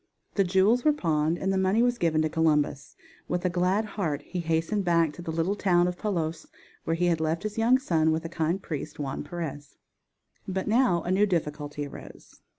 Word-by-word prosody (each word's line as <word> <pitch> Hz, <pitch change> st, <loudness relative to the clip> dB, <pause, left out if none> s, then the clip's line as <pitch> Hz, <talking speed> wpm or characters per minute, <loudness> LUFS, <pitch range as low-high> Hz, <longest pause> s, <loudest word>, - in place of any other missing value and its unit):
The 200 Hz, -, +3 dB
jewels 195 Hz, +6 st, +3 dB
were 305 Hz, -, +4 dB
pawned 160 Hz, -, 0 dB
and 190 Hz, +1 st, -1 dB
the 190 Hz, -, +1 dB
money 190 Hz, +5 st, +3 dB
was 245 Hz, -1 st, +1 dB
given 160 Hz, -2 st, +2 dB
to -, -, +2 dB
Columbus. 150 Hz, -3 st, 0 dB, 0.3 s
With 180 Hz, +1 st, -2 dB
a 180 Hz, -, +2 dB
glad 185 Hz, +4 st, +1 dB
heart 160 Hz, -9 st, -3 dB
he 180 Hz, -, -5 dB
hastened 165 Hz, +5 st, 0 dB
back 170 Hz, -3 st, +2 dB
to 175 Hz, -, -9 dB
the 170 Hz, -, -7 dB
little 165 Hz, +5 st, 0 dB
town 180 Hz, -3 st, +3 dB
of 180 Hz, -, -2 dB
Palos 170 Hz, -5 st, -3 dB, 0.4 s
where 165 Hz, -, 0 dB
he 175 Hz, +2 st, 0 dB
had 170 Hz, -2 st, +1 dB
left 160 Hz, +3 st, -1 dB
his 215 Hz, +1 st, -4 dB
young 240 Hz, +3 st, +5 dB
son 160 Hz, -11 st, +1 dB
with 160 Hz, +1 st, -1 dB
the -, -, -4 dB
kind 165 Hz, +2 st, -1 dB
priest 150 Hz, -4 st, -5 dB
Juan 140 Hz, -2 st, -4 dB
Perez. 145 Hz, -3 st, -6 dB, 0.7 s
But 190 Hz, 0 st, -2 dB
now 225 Hz, -6 st, +3 dB
a 175 Hz, -, -2 dB
new 200 Hz, +3 st, +3 dB
difficulty 150 Hz, -4 st, -2 dB
arose. 140 Hz, -, -12 dB
175 Hz, 205 wpm, -27 LUFS, 160-195 Hz, 0.7 s, young